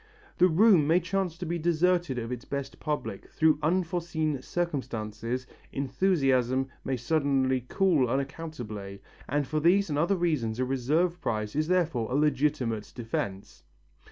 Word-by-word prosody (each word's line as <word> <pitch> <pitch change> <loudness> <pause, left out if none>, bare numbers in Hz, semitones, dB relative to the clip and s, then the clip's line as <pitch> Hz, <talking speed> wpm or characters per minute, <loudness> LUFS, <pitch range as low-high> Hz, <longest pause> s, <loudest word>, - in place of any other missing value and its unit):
The 180 - +7
room 180 -3 +5
may 165 +3 +5
chance 180 -1 -2
to 180 - -5
be 170 +1 -2
deserted 175 -3 +1
of 115 0 -4
its 125 -1 -4
best 140 -1 -5
public 150 -1 -4
through 155 -2 +3
unforeseen 165 -3 0
circumstances, 125 -7 -3 0.3
enthusiasm 135 -3 +1
may 130 - -1
suddenly 130 -2 +1
cool 170 - +3
unaccountably, 120 -8 -5 0.3
and 145 +1 +1
for 155 +3 -1
these 175 +3 +3
and 145 - 0
other 175 +6 +2
reasons 150 -11 0
a 130 - 0
reserve 150 +8 0
price 105 0 -2
is 155 +1 +1
therefore 165 -11 +1
a - - 0
legitimate 140 -7 0
defence. 100 -5 -4
145 Hz, 140 wpm, -28 LUFS, 125-170 Hz, 0.3 s, The